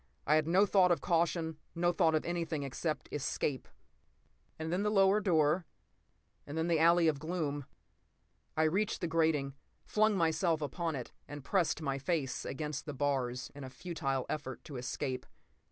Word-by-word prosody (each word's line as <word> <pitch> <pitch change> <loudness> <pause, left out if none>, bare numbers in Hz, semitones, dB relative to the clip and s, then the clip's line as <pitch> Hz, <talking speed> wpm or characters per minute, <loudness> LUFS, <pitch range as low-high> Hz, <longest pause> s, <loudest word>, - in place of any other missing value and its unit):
I 150 - +3
had 155 0 +3
no 185 +5 +5
thought 185 -2 +4
of 175 - +3
caution, 165 -2 0 0.2
no 175 +1 +2
thought 165 -2 +3
of 155 - 0
anything 165 -3 -2
except 150 +4 -3
escape. 140 -2 -2 0.9
And 160 +1 -3
then 185 - +1
the 210 - +1
lower 195 0 +5
door, 165 -2 +2 0.8
and 145 +2 -5
the 165 0 +2
alley 170 +1 +5
of 150 -3 +1
gloom. 150 -3 -2 0.9
I 160 - +4
reached 190 +7 +1
the 175 - 0
grating, 160 -4 +1 0.3
flung 215 -1 +3
myself 165 -1 +2
upon 160 +2 -2
it 125 -3 -6 0.2
and 145 -1 -8
pressed 170 -1 +1
my 140 -1 -1
face 145 -3 -1
against 150 +1 -4
the 145 - -4
bars 130 -3 -1
in 145 - -9
a 130 - -6
futile 135 -4 -3
effort 135 -4 -5
to 140 - -7
escape. 125 +1 -3
160 Hz, 165 wpm, -33 LUFS, 145-175 Hz, 0.9 s, no